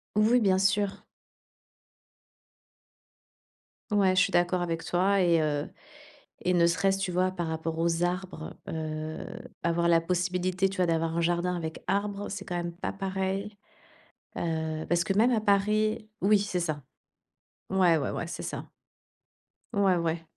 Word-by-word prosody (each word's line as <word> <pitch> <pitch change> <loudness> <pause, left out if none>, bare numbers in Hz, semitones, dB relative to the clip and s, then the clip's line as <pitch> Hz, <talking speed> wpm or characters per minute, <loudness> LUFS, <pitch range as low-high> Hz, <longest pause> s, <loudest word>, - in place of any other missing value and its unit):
Oui, 220 +4 +5
bien 190 -4 +3
sûr. 200 0 +1 2.9
Ouais, 195 -2 +3
je 185 - +5
suis 195 - +2
d'accord 175 0 +2
avec 165 -1 -2
toi 190 +2 +2
et 170 -2 +4
heu 145 -1 -1 0.7
et 180 - +1
ne 170 -1 +5
serait-ce, 195 +3 +2
tu 195 -2 -2
vois, 185 +1 +1
par 175 -3 -3
rapport 160 0 -3
aux 165 +1 +1
arbres, 180 -2 -4
heu, 155 0 -4 0.4
avoir 170 0 +1
la 165 -1 +5
possibilité, 180 +2 0
tu 195 - -7
vois, 180 -2 +2
d'avoir 165 0 0
un - - +2
jardin 175 +1 +1
avec 160 -2 -5
arbre, 200 +1 -1
c'est 200 0 -5
quand 180 - -5
même 175 0 -3
pas 180 - -3
pareil, 195 +1 -3 0.8
heu, 160 -1 -2
parce 175 -1 +2
que 190 - 0
même 225 +5 +4
à 225 -3 +2
Paris 215 +2 +2
oui, 205 +2 +5
c'est 200 -2 -1
ça. 155 -5 -2 0.9
Ouais, 180 -4 +4
ouais, 140 - -1
ouais, - - -3
c'est - - -6
ça. - - -5 1.0
Ouais, 200 -3 +3
ouais. 165 0 -1
180 Hz, 155 wpm, -28 LUFS, 165-195 Hz, 2.9 s, Oui